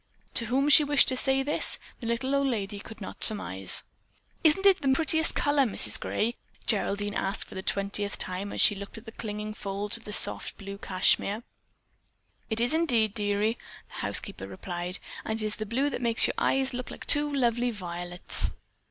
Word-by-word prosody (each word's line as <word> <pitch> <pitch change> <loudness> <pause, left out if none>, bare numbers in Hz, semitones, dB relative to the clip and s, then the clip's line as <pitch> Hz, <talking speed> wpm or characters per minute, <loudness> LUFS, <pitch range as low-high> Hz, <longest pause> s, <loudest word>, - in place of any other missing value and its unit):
To 235 - +1
whom 270 +5 +1
she 295 +1 +8
wished 290 -1 +4
to 260 - +1
say 270 +1 +1
this, 290 +2 +1 0.2
the 230 - -6
little 260 +4 -1
old 280 0 +2
lady 205 -5 -3
could 220 +1 -12
not 190 - -6
surmise. 95 - +1 0.6
"Isn't 330 +5 +4
it 390 -2 +5
the 270 -2 +2
prettiest 320 +3 +1
color, 290 0 +2
Mrs. 245 -6 +5
Gray?" 235 +3 -2 0.3
Geraldine 205 -1 0
asked 195 +1 -1
for - - -13
the 190 - -5
twentieth 200 +1 -2
time 185 +2 -2
as - - +1
she - - +7
looked 200 +2 -9
at 220 - -12
the 225 - -9
clinging 215 -1 -6
folds 205 +1 -3
of 210 -2 -1
soft - - +1
blue 200 0 -8
cashmere. 200 +3 +2 1.1
"It 220 -1 +3
is 240 +5 +2
indeed, 240 -11 +2
dearie," 210 +2 0 0.3
the - - -18
housekeeper 95 - 0
replied, 175 - -2 0.3
"and 220 0 -3
it's 215 -1 -1
the 215 - -5
blue 270 +6 0
that - - -4
makes 230 -2 +3
your - - 0
eyes 265 0 +1
look 250 0 -5
like - - -10
two 295 0 +4
lovely 245 -3 +1
violets." 175 -4 -3
220 Hz, 185 wpm, -27 LUFS, 200-265 Hz, 1.1 s, she